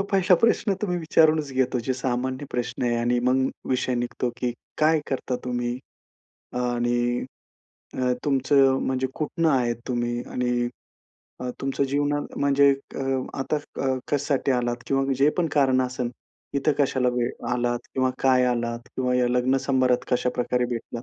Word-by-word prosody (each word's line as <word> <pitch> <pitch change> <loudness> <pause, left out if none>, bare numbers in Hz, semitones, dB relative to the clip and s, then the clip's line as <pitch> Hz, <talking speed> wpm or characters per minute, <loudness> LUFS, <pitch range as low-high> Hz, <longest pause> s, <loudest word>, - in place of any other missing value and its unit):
हा - - 0
पहिला 190 -1 +5
प्रश्न 230 -3 +3
तुम्ही 180 -4 0
विचारूनच 155 -2 +3
घेतो 130 -1 +1
जो 130 - +2
सामान्य 130 +2 -2
प्रश्न 120 0 -3
आहे 120 -1 +1
आणि 120 +1 +1
मग 130 +1 +2 0.2
विषय 130 0 +1
निघतो, 120 0 -2
की 125 0 -1 0.3
काय 155 0 +4
करता 130 -1 -1
तुम्ही? 120 0 -2 0.8
आणि 120 0 0 0.7
अ, 125 -1 +1
तुमचं 135 -1 +3
म्हणजे 130 0 0
कुठनं 160 +2 0
आहेत 120 -4 +1
तुम्ही 120 -1 -1
आणि 125 -1 0 0.7
अ, 125 - -3
तुमच्या 135 0 0
जीवनात 145 +1 -1
म्हणजे 140 0 +4
एक 140 0 -5 0.4
आता 135 +3 0 0.3
अ, - - 0 0.2
कशासाठी 145 -1 0
आलात 120 -1 0
किंवा 135 0 +1
जे 140 +2 +5
पण 175 - +3
कारण 135 -3 +3
असेल 125 -1 -2 0.4
इथं 140 +2 +2
कशाला 130 -3 +2
वे 120 -1 0 0.2
आलात 120 0 0 0.2
किंवा 130 0 +2
काय 130 -1 +4
आलात 120 -1 -2
किंवा 125 -1 +1
या 125 -1 +2
लग्न 125 +2 +2
समारंभात 130 -2 +2
कशा 125 0 +2
प्रकारे 125 0 +1
भेटलात? 120 -1 -5
130 Hz, 155 wpm, -25 LUFS, 120-140 Hz, 0.8 s, पहिला